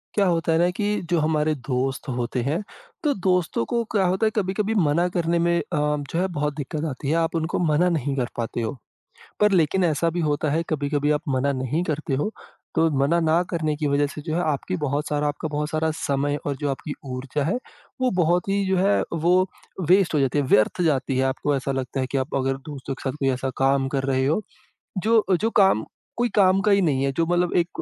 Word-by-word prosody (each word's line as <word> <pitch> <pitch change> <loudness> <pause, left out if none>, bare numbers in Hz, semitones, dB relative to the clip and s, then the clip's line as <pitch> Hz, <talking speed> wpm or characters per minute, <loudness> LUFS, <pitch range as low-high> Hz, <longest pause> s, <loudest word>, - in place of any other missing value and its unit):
क्या 200 -2 +3
होता 165 -2 +1
है 160 - +3
ना 175 +1 +4
कि 205 +3 -2 0.2
जो 170 - +3
हमारे 155 0 +1
दोस्त 135 +2 -1
होते 125 +1 -1
हैं, 150 - -1 0.4
तो 295 -2 +2
दोस्तों 180 -9 0
को 235 -1 +1
क्या 200 -3 +2
होता 190 +4 +1
है - - 0
कभी-कभी 205 +1 0
मना 170 -2 +2
करने 170 -1 +1
में 170 0 +2
अ, - - -2
जो 150 +1 -1
है 185 - +1
बहुत 150 0 0
दिक्कत 150 +2 -4
आती 135 +1 -5
है 160 - +2
आप 165 +1 -1
उनको 160 +1 -1
मना 170 +1 +3
नहीं 140 -2 -1
कर 125 -3 0
पाते 115 0 -2
हो। 115 +5 -3 0.7
पर 210 -1 +4
लेकिन 180 +2 +3
ऐसा 165 0 +1
भी 175 - -2
होता 150 -1 0
है 160 +3 +1
कभी-कभी 145 -1 0
आप 150 - +1
मना 135 +1 +1
नहीं 130 +5 -1
करते 155 -3 -2
हो, 150 +10 0 0.4
तो 165 0 +3
मना 160 +5 +3
ना 165 +1 +3
करने 155 -3 -1
की 150 0 -2
वज़ह 140 +1 +2
से - - -6
जो 155 - -1
है - - +1
आपकी 185 +6 -3
बहुत 145 +3 -1
सारा 150 0 0
आपका 145 +2 -3
बहुत 150 0 -2
सारा 160 0 0
समय 140 +1 0
और 140 -2 -1
जो 145 +1 -2
आपकी 145 +2 -4 0.2
ऊर्जा 135 +3 -3
है 190 - 0 0.4
वो 255 -1 +2
बहुत 175 +3 +1
ही 200 0 +1
जो 190 0 +1
है 200 +2 +3
वो 175 +3 +3 0.5
वेस्ट 185 -2 +4
हो 150 - +3
जाती, 135 +2 +2
व्यर्थ 130 - +2
जाती 135 -5 +1
है। 130 - +2
आपको 140 +2 0
ऐसा 135 +1 -2
लगता 135 0 -3
है 130 - 0
की 135 - 0
आप 130 +3 -3
अगर 135 0 0
दोस्तों 135 -1 -5
के 135 - -5
साथ 130 - -8
कोई 135 -1 +2
ऐसा 130 +1 -3
काम 135 0 +2
कर 135 - -1
रहे 130 0 +1
हो 160 +9 +1 0.6
जो 220 +3 +3 0.2
जो 225 - +2
काम 190 - +3 0.3
कोई 240 0 +1
काम 190 -1 +5
का 210 - +4
ही 200 0 +4
नहीं 140 -6 +1
है 140 - +1
जो 165 - +3
मतलब 175 0 +1
एक 170 -1 +2
155 Hz, 230 wpm, -24 LUFS, 140-175 Hz, 0.7 s, काम